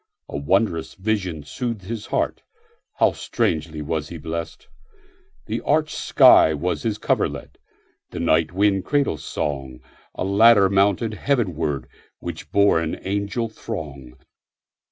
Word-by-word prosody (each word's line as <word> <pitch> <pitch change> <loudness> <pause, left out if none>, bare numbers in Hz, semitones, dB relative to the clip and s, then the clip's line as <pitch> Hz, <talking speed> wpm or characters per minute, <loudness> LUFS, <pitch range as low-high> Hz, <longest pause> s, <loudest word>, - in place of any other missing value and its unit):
A - - -8
wondrous 80 +2 0
vision 95 -6 -2
soothed 115 - -4
his 110 +2 -6
heartHow - - -2
strangely 80 -1 -2
was 75 0 -3
he 85 - -7
blessed! 80 +2 -6 0.8
The - - -3
arched 155 +1 +1
sky 80 - +6
was 90 +4 -2
his 110 -3 -1
coverlet, - - -2 0.5
The - - -7
night 85 -1 +2
wind 95 0 +2
cradle 140 - 0
song;A 65 0 -6
ladder 100 0 +5
mounted 100 +3 +2
heavenwardWhich 85 - -3
bore 100 -4 +4
an 80 -1 -3
angel 100 +4 -1
throng. 75 - -8
95 Hz, 115 wpm, -22 LUFS, 80-105 Hz, 0.8 s, sky